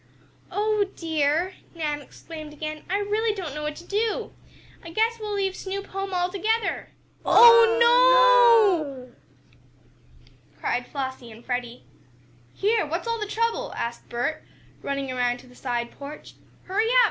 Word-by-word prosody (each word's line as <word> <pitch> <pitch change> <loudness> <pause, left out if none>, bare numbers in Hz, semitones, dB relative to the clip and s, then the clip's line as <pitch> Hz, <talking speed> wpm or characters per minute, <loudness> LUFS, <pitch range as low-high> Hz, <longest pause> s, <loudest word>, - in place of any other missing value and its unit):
"Oh, 425 0 +1
dear!" 320 +2 0 0.2
Nan 300 -3 -2
exclaimed 310 +2 -11
again. 310 0 -6
"I 390 - +1
really 420 +2 0
don't 345 -8 -5
know 300 - -5
what 300 0 -4
to 345 - -11
do! 425 +4 -2 0.5
I 335 - -9
guess 450 +6 0
we'll 420 -1 -4
leave 385 -2 -1
Snoop 395 +1 -5
home 390 0 -5
altogether!" 390 +5 -1 0.3
"Oh, 465 -1 +7 1.3
no!" 250 - -20 1.5
cried 245 0 -2
Flossie 260 -4 -6
and 225 +2 -14
Freddie. 245 -1 -4 0.7
"Here! 430 +2 +1
What's 335 +8 -4
all 460 0 -1
the 420 - -3
trouble?" 460 +3 -2
asked 235 0 -5
Bert, 245 +6 -3 0.4
running 275 -1 -3
around 245 -1 0
to - - -18
the 250 - -17
side 240 -2 -3
porch. 285 +2 -10 0.3
"Hurry 425 +4 0
up! - - +1
345 Hz, 140 wpm, -25 LUFS, 280-425 Hz, 1.5 s, Oh